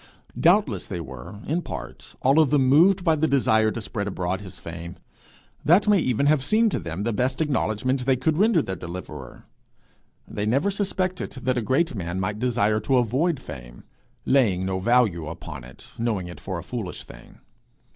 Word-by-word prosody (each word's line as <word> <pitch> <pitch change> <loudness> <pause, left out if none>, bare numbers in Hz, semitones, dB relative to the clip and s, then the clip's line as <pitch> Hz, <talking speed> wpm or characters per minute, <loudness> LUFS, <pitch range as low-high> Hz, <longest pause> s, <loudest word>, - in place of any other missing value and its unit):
Doubtless 165 - +3
they 90 - -4
were, 80 - -9
in 165 +4 -1
part, - - -8
all 135 +4 +5
of 155 -4 +4
them 135 -2 +3
moved 180 +8 +5
by 165 -3 +4
the 155 +1 +1
desire 110 -6 +3
to 115 - -4
spread 105 -1 -4
abroad 95 -1 -2
his 95 -2 -9
fame; 85 +1 -8 0.7
that 180 +7 +4
may 205 -2 +5
even 130 -2 +1
have 145 -2 +3
seemed 220 +8 +3
to - - -1
them 85 +4 -5
the 115 +1 0
best 125 +4 -1
acknowledgment 130 -3 0
they 135 - +4
could 140 +5 0
render 205 -7 +4
their 95 - -4
deliverer. 90 +1 -8 0.8
They 105 +1 -3
never 140 - +2
suspected 190 -2 -2
that 130 -1 -1
a - - -2
great 135 +8 +1
man 90 -3 -4
might 105 +2 -2
desire 115 -3 +1
to 120 +5 +1
avoid 130 +7 +1
fame, - - -10 0.4
laying 105 -9 +2
no 95 0 -1
value 100 -7 +2
upon 80 -4 -8
it, 65 +1 -14
knowing 110 -6 -1
it 90 - -9
for 95 -2 -5
a 85 - -6
foolish 110 -8 -5
thing. - - -14
120 Hz, 185 wpm, -24 LUFS, 95-150 Hz, 0.8 s, all